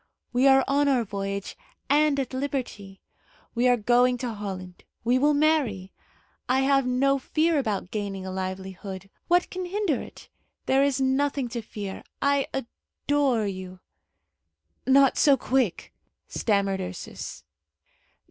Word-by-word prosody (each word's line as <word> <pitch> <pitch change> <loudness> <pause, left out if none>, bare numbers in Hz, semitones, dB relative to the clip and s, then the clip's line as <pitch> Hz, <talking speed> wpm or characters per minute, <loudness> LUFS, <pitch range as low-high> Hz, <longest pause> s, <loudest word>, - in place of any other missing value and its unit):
We 250 +3 +4
are 270 0 +6
on 285 +1 +2
our 260 -4 +3
voyage, 200 -1 -4 0.3
and 295 -1 +3
at 265 -1 -3
liberty. 255 -8 -4 0.5
We 245 +1 +2
are 245 -1 +4
going 245 +3 +3
to 240 -2 -4
Holland. 190 -4 -7 0.2
We 245 +2 +3
will 295 +2 +3
marry. 280 -12 +1 0.6
I 260 +1 +3
have 275 -1 +3
no 275 +2 +2
fear 315 +3 +1
about 210 -7 -2
gaining 200 -3 -4
a 190 - -5
livelihood. 190 +1 -6 0.2
What 355 +1 +2
can 370 0 -4
hinder 370 - -1
it? - - -12 0.4
There 270 +1 +3
is 280 -1 +1
nothing 270 0 +1
to 235 0 -4
fear. 205 -3 -7 0.2
I 280 -1 +2
adore 270 -1 -1
you!" 185 -2 -6 1.1
"Not 270 0 +5
so 280 -3 +5
quick!" 255 -9 -1 0.3
stammered 200 -3 0
Ursus. 180 -1 -7
250 Hz, 135 wpm, -26 LUFS, 200-275 Hz, 1.1 s, are